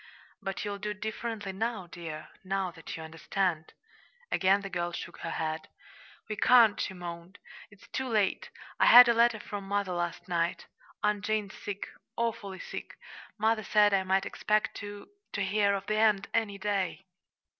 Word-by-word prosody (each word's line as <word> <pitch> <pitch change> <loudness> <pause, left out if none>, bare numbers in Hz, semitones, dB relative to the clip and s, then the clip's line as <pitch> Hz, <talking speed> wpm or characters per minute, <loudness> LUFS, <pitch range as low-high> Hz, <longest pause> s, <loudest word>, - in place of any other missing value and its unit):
"But 195 +2 -4
you'll 200 -1 -4
do 210 0 -3
differently 215 -1 -4
now, 220 -1 -2
dear, 165 -3 -8
now 190 -1 -1
that 165 -1 -8
you 160 - -7
understand." 165 +1 -2 0.6
Again 195 +2 +3
the 195 - -6
girl 175 -1 -1
shook - - -7
her 165 - -4
head. 160 -1 -3 0.6
"We 215 -1 -4
can't," 235 -4 +6
she 190 - -3
moaned. 175 +1 -8 0.3
"It's 200 -2 -18
too 265 0 -2
late. 210 -5 +1 0.3
I - - +5
had 245 0 +11
a 235 - +5
letter 235 -1 +4
from 200 -1 -6
mother 200 -1 0
last 175 0 -3
night. 170 -1 -1 0.4
Aunt 210 -1 +1
Jane's 215 -2 -1
sick 200 -1 -5 0.3
awfully 215 -4 -2
sick. - - -8 0.4
Mother 220 +1 +2
said 210 0 +4
I 195 - +4
might 190 +1 +1
expect 215 0 0
to 205 0 -8 0.3
to 200 - 0
hear 200 +1 +2
of 195 - -4
the 215 +1 0
end 210 -2 +3
any 215 -3 0
day." 195 -2 -2
200 Hz, 165 wpm, -30 LUFS, 185-215 Hz, 0.6 s, had